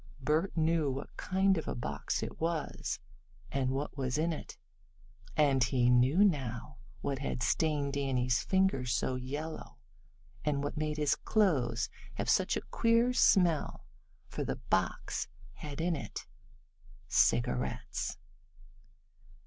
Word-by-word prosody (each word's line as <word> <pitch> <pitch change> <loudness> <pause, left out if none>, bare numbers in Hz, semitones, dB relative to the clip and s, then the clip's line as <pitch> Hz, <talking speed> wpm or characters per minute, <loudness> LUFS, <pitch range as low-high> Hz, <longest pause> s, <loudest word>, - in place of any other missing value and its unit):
Bert 155 +8 0
knew 160 -2 +2
what 135 +1 -5
kind 190 -1 +2
of - - -7
a - - -2
box 70 -12 -2
it - - -7
was, 165 -1 -2 0.5
and 135 -2 0
what 135 +2 -2
was 130 -1 -1
in 165 +2 +1
it, - - -8 0.8
and 140 -4 +4
he 125 -1 +3
knew 130 +10 +5
now, 135 - 0 0.2
what 135 -2 -2
had 130 -2 -2
stained 145 -3 +1
Danny's 130 -3 +1
fingers 190 -11 +1
so 130 - 0
yellow, 145 +5 -5 0.7
and 145 -2 0
what 145 - -3
made 155 0 -2
his 150 -2 +3
clothes 125 - +1 0.3
have - - 0
such - - +2
a - - -3
queer 230 +2 +3
smell. 175 -9 +3 0.4
For - - -4
the - - -2
box - - -1 0.3
had 145 -1 -7
in 170 +1 +1
it 140 - -6 0.8
cigarettes. 65 +2 +1
145 Hz, 130 wpm, -32 LUFS, 130-165 Hz, 0.8 s, knew